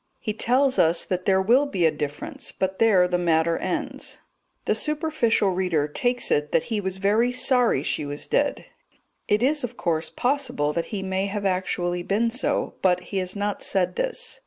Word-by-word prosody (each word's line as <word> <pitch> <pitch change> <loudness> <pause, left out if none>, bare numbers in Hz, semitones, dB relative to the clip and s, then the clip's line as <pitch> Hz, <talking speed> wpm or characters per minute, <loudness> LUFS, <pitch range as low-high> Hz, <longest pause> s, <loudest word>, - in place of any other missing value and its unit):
He 215 - -3
tells 260 +5 +2
us 165 +1 +3
that 185 -1 -3
there 190 -1 +3
will 255 +8 +4
be 185 -10 0
a 160 - +4
difference; 145 -1 -5
but 190 0 -3
there 200 -6 +5
the 180 0 0
matter 165 -1 +2
ends. 275 -4 -3 0.5
The - - +2
superficial 300 - +1
reader 180 -5 0
takes 245 +11 -1
it 150 0 +1
that - - +3
he 210 - 0
was 190 -1 -4
very 215 +5 +2
sorry 250 - +3
she - - -1
was 145 0 -5
dead; - - 0 0.6
it 210 +3 +2
is, 290 +2 +2
of 245 0 -5
course, 160 -1 -1
possible 205 - 0
that 170 +1 -1
he 200 -3 -5
may 190 +1 -1
have 200 0 -4
actually 180 -2 -1
been 215 +6 0
so, 275 +4 -1
but 180 -2 +3
he - - 0
has 185 +1 -3
not 205 0 -2
said 185 -2 0
this. - - -3
195 Hz, 185 wpm, -24 LUFS, 175-245 Hz, 0.6 s, there